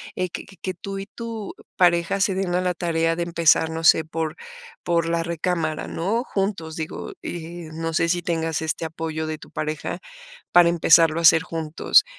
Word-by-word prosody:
eh, 185 0 -1
que - - -7
que 195 - -17
que 185 - -3
tú 195 +3 -6
y 195 - -5
tu 225 -2 -6 0.2
pareja 175 +1 +3
se 190 0 +2
den 190 -2 -1
a 180 - +2
la 180 -1 0
tarea 165 -1 0
de 170 - -1
empezar, 170 -1 +3
no 160 0 -4
sé, 160 0 +6
por 160 -1 -3 0.5
por 170 -1 +1
la 165 0 0
recámara, 170 -1 -2
¿no? 210 +8 -1
Juntos, 195 -8 -3
digo, 160 -1 -5
eh, 170 -1 -6
no 165 +1 -3
sé 165 - +2
si 175 +1 +1
tengas 165 -2 -1
este 160 +1 -2
apoyo 160 0 -4
de 155 0 -3
tu - - -13
pareja 155 -1 -3 0.5
para 175 -1 +7
empezarlo 165 -1 +5
a - - -1
hacer 165 -1 +7
juntos. 165 -3 +2
170 Hz, 190 wpm, -23 LUFS, 160-180 Hz, 0.5 s, para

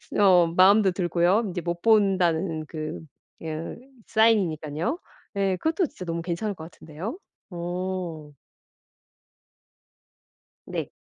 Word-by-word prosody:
스 - - -13
어 185 -4 +6
마음도 195 +1 +6
들고요. 180 +4 +2
'이제 175 0 -3
못 170 0 -4
본다.'는 185 -6 +2
그 155 0 -5 0.4
으 160 0 -5 0.3
사인이니깐요. 190 - +1 0.4
예. 195 -2 +1
그것도 320 - 0
진짜 185 - -10
너무 170 0 -3
괜찮을 175 +5 -2
것 160 - -9
같은데요? 175 - -7 0.3
어. 175 -3 -4 2.4
네. - - -4
180 Hz, 220 characters per minute, -25 LUFS, 165-200 Hz, 2.4 s, 어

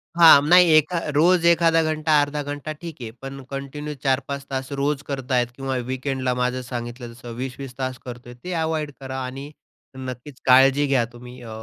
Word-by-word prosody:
हां. 165 -4 +9
नाही 180 -1 +7
एका 160 +3 +2 0.2
रोज 170 +3 +4
1खादा 165 -1 +4
घंटा 155 -1 +2
अर्धा 145 +1 -2
घंटा 145 +2 -5
ठीक 160 -2 -10
आहे. 115 -2 -6
पण 135 0 -7
कंटिन्यू 140 +2 -5
4-5 140 0 -1
तास 135 +1 -4
रोज 145 0 0
करतायेत 130 -3 0
किंवा 135 -1 -3 0.2
वीकेंडला. 130 -1 -1
माझं 125 +1 -1
सांगितलं 120 0 -6
तसं 120 0 -10
20-20 130 0 -6
तास 130 -1 -3
करतोय 120 0 -9
ते 180 - -4
अव्हॉइड 160 -2 -2
करा 130 0 -5
आणि 135 +3 -7 0.5
नक्कीच 130 +1 -8
काळजी 135 +2 +6
घ्या 130 -4 +2
तुम्ही 125 +1 -12
अ, 115 - -10
135 Hz, 170 wpm, -23 LUFS, 125-150 Hz, 0.5 s, हां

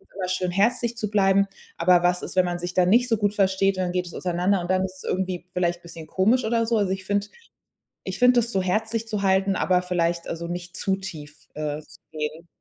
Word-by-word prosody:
immer 185 -2 -3
schön 185 -1 -1
herzlich 230 +5 +1
zu 210 -2 -2
bleiben. 200 -1 +3 0.3
Aber 180 -1 +4
was 180 0 +2
ist, - - -6
wenn 185 - +5
man 175 0 -2
sich 175 0 -4
dann 180 -1 +3
nicht 245 +4 +4
so 225 - +2
gut 205 -1 +1
versteht 195 0 +2
und 185 - 0
dann 180 - -1
geht 180 0 -1
es 175 - -10
auseinander 180 +2 0
und 175 +1 -2
dann 185 0 +2
ist 190 0 -8
es - - -11
irgendwie 185 -2 -2
vielleicht 175 -1 0
bisschen 165 -2 -10
komisch 220 +7 +2
oder 230 0 +1
so? 230 0 +1
Also, 200 -3 +1
ich 190 0 -3
finde 205 +1 0 0.8
ich - - -5
finde 250 -1 +6
das 235 +1 -3
so 190 -1 +1
herzlich 220 +4 -1
zu 210 -3 -2
halten, 195 0 +2
aber 180 -1 +2
vielleicht 170 -1 -1
also 170 0 -4
nicht 175 0 -5
zu 195 - 0
tief, 155 -6 -9
äh, 150 0 -3
zu - - -18
gehen. 155 +2 -5
185 Hz, 240 wpm, -24 LUFS, 175-205 Hz, 0.8 s, finde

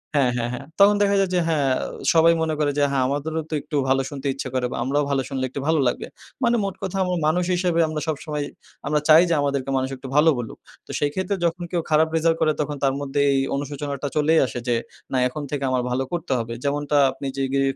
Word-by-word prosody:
হ্যাঁ, 135 -4 +3
হ্যাঁ, 120 0 -1
হ্যাঁ। 135 - -6
তখন 200 +1 +7
দেখা 200 0 +3
যায় 195 -1 +2
যে, - - +3
হ্যাঁ, 145 -5 +1 0.4
সবাই 165 +1 +6
মনে 160 -1 0
করে 145 -1 +2
যে, - - +3
হ্যাঁ, 135 -2 +1
আমাদেরও 150 +4 -2
তো - - -6
একটু 150 - -7
ভালো 135 0 +3
শুনতে 140 -1 -5
ইচ্ছা 135 -1 -5
করে 130 -1 +1
বা - - -4
আমরাও 145 +2 +1
ভালো 135 -1 +1
শুনলে 130 -1 -2
একটু 140 - -6
ভালো 160 -1 +3
লাগবে। 120 - -2 0.4
মানে 240 0 +3
মোট 195 -1 -3
কথা 195 0 -2 0.3
মানুষ 175 +3 +1
হিসেবে 175 -2 +1
আমরা 155 -1 -3
সবসময় 150 -1 -3 0.4
আমরা 150 0 +2
চাই 155 +1 +9
যে, - - +3
আমাদেরকে 140 -2 -1
মানুষ 130 0 -1
একটু 130 - -9
ভালো 150 +2 +6
বলুক। 120 -2 -6 0.3
তো - - -7
সেই 145 - +1
ক্ষেত্রে 190 +1 -1
যখন 170 +1 -1
কেউ 175 -2 0
খারাপ 155 +1 +4
রেজাল্ট 165 0 +2
করে 155 -1 +4
তখন 150 0 -3
তার 135 -1 +3
মধ্যে 145 0 -2
এই 135 - +2 0.2
অনুশোচনাটা 145 0 -4
চলেই 155 +2 +4
আসে 120 0 -5
যে, 120 - +2 0.4
না, 130 - 0
এখন 145 +4 -6
থেকে 145 -2 -2
আমার 130 -1 +1
ভালো 130 +2 0
করতে 170 -4 -3
হবে। 115 0 -4
যেমনটা 145 +1 0
আপনি 135 +1 -6
জিগে 135 0 0
145 Hz, 230 wpm, -23 LUFS, 135-160 Hz, 0.4 s, চাই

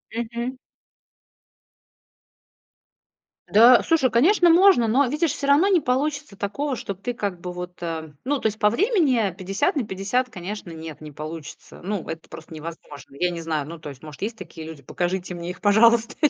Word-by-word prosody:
Мгм. 235 +2 -4 2.9
Да, 235 +4 +7
слушай, 310 -6 +3
конечно, 345 - +4
можно. 345 - +6
Но 265 +5 +3
видишь, 300 +3 0
всё 280 - -4
равно 290 +7 +5
не 365 -5 +4
получится 280 -2 -1
такого, 265 +8 -2
что 200 - -5
ты 200 +6 -5
как 200 -6 -3
бы 180 - -5
вот, 180 0 -8
э, 160 -2 -4
ну, 285 +2 0
то - - -13
есть 215 0 -4
по 210 - +4
времени 270 - +2
50/50, 195 - -1
конечно, 190 -1 -7
нет, 160 -2 -9
не 155 -1 -9
получится. 155 +1 -9
Ну, 195 -2 -3
это 160 0 -7
просто 160 +1 -11
невозможно. 150 -4 -10
Я 180 - +2
не 170 -1 -5
знаю. 155 -3 -2
Ну, 170 +1 -8
то 155 -2 -8
есть, 135 -1 -12
может, 150 -2 -11 0.2
такие 165 -3 -9
люди, 155 -3 -10
покажите 180 +5 -3
мне 175 0 -6
их, 180 - -8
пожалуйста. 230 +3 +4
205 Hz, 165 wpm, -23 LUFS, 170-255 Hz, 2.9 s, Да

